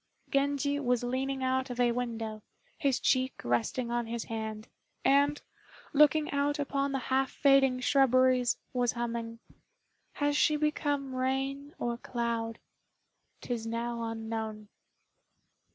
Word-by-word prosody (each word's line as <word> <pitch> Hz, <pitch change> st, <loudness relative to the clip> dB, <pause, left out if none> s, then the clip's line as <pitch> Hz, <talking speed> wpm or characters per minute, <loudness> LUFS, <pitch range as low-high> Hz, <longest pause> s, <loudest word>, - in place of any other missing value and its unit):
Genji 285 Hz, 0 st, +1 dB
was 250 Hz, -3 st, +1 dB
leaning 265 Hz, +2 st, -2 dB
out 260 Hz, 0 st, 0 dB
of 245 Hz, 0 st, -6 dB
a 240 Hz, -1 st, +4 dB
window, 225 Hz, -3 st, -3 dB, 0.4 s
his 275 Hz, -3 st, +1 dB
cheek 260 Hz, 0 st, +2 dB
resting 120 Hz, -, 0 dB
on 240 Hz, -1 st, -1 dB
his 235 Hz, 0 st, -3 dB
hand; 220 Hz, 0 st, -5 dB, 0.4 s
and, 285 Hz, +2 st, +4 dB, 0.5 s
looking 300 Hz, +1 st, +4 dB
out 285 Hz, +1 st, +1 dB
upon 280 Hz, -1 st, -1 dB
the 270 Hz, -, 0 dB, 0.2 s
half 265 Hz, 0 st, +2 dB
fading 270 Hz, -2 st, +4 dB
shrubberies, 255 Hz, -2 st, +4 dB, 0.2 s
was 245 Hz, -2 st, +1 dB
humming 235 Hz, -1 st, -3 dB, 0.8 s
"Has 290 Hz, 0 st, 0 dB
she 305 Hz, +1 st, +4 dB
become 290 Hz, -3 st, -1 dB
rain 270 Hz, +2 st, -2 dB
or 240 Hz, -1 st, -2 dB
cloud? 230 Hz, -2 st, -2 dB, 0.8 s
'Tis 230 Hz, -2 st, -3 dB
now 235 Hz, +1 st, -3 dB
unknown." 220 Hz, -2 st, -4 dB
255 Hz, 120 wpm, -30 LUFS, 235-275 Hz, 0.8 s, a